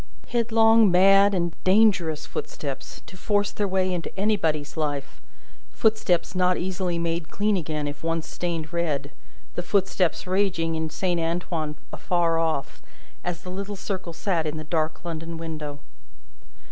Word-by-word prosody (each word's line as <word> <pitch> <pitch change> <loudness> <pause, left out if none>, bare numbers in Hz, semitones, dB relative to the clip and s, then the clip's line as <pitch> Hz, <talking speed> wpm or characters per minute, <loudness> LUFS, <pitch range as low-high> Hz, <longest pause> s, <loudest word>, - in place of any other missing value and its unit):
Headlong, 225 -2 +5
mad, 195 +2 +6
and 170 -2 0
dangerous 185 -6 +3
footsteps 140 -3 -6
to - - -12
force 205 +2 +1
their 205 - -1
way 185 -1 +1
into 170 -2 -3
anybody's 160 -9 +1
life, 145 -3 -3 0.5
footsteps 215 -7 +1
not 180 -1 +2
easily 180 -1 -1
made 170 -1 -2
clean 210 0 +1
again 155 -4 -2
if 145 +1 -6
once 165 -1 -1
stained 170 -2 -3
red, 150 -4 -1 0.4
the - - -2
footsteps 185 -1 +1
raging 180 -3 +1
in 160 0 -2
Saint 175 +2 -1
Antoine 165 -2 -2 0.2
afar 170 -3 +1
off, 160 -4 -1 0.4
as 175 -1 -4
the 180 - -6
little 200 +2 -4
circle 190 -3 -4
sat 165 -1 -1
in 155 +1 -3
the 155 - -5
dark 155 +1 -1
London 165 0 -5
window. 155 -3 -5
175 Hz, 145 wpm, -25 LUFS, 160-190 Hz, 0.5 s, mad